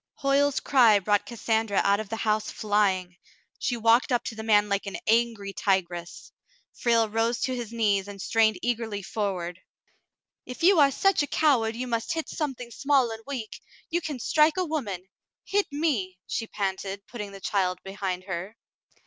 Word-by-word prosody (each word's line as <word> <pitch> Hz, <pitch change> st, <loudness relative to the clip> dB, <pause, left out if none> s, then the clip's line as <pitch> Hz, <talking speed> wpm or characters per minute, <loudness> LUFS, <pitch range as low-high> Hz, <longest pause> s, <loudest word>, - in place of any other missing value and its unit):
Hoyle's 280 Hz, -1 st, +2 dB
cry 240 Hz, -6 st, +5 dB
brought 205 Hz, +1 st, +1 dB
Cassandra 225 Hz, -3 st, 0 dB
out 200 Hz, +1 st, +3 dB
of 215 Hz, -2 st, -6 dB
the 225 Hz, -, -2 dB
house 215 Hz, -1 st, 0 dB
flying. 195 Hz, -4 st, 0 dB, 0.4 s
She 245 Hz, -3 st, -1 dB
walked 230 Hz, +4 st, +3 dB
up 245 Hz, -1 st, +2 dB
to 225 Hz, -, -5 dB
the 220 Hz, -, -6 dB
man 210 Hz, -2 st, +3 dB
like 200 Hz, 0 st, -1 dB
an 195 Hz, -, -4 dB
angry 225 Hz, -3 st, +1 dB
tigress. 175 Hz, -3 st, -2 dB, 0.4 s
Frale 230 Hz, -2 st, +2 dB
rose 225 Hz, +2 st, 0 dB
to 255 Hz, -, 0 dB
his 235 Hz, -3 st, -5 dB
knees 205 Hz, -4 st, +1 dB
and 200 Hz, -1 st, -9 dB
strained 220 Hz, 0 st, +2 dB
eagerly 225 Hz, -4 st, -2 dB
forward. 185 Hz, -4 st, -3 dB, 0.8 s
"If 250 Hz, +5 st, -8 dB
you 365 Hz, -1 st, +6 dB
are 285 Hz, -2 st, +7 dB
such 390 Hz, +6 st, +2 dB
a 290 Hz, -, -1 dB
coward 245 Hz, -9 st, +2 dB
you 250 Hz, +2 st, -3 dB
must 235 Hz, +6 st, -2 dB
hit 320 Hz, -1 st, -3 dB
something 265 Hz, -6 st, -4 dB
small 265 Hz, 0 st, +2 dB
and 225 Hz, 0 st, -7 dB
weak, 250 Hz, -6 st, -6 dB, 0.3 s
you 345 Hz, +1 st, +1 dB
can 300 Hz, -4 st, -4 dB
strike 305 Hz, +7 st, +3 dB
a 370 Hz, -, +1 dB
woman. 210 Hz, -, -4 dB, 0.4 s
Hit 410 Hz, 0 st, +1 dB
me," 265 Hz, -, -1 dB
she 225 Hz, -, -3 dB
panted, 195 Hz, -1 st, -3 dB
putting 210 Hz, -4 st, -7 dB
the 195 Hz, -, -10 dB
child 185 Hz, -2 st, 0 dB
behind 195 Hz, -2 st, -4 dB
her. 190 Hz, +3 st, -6 dB
225 Hz, 175 wpm, -26 LUFS, 200-255 Hz, 0.8 s, are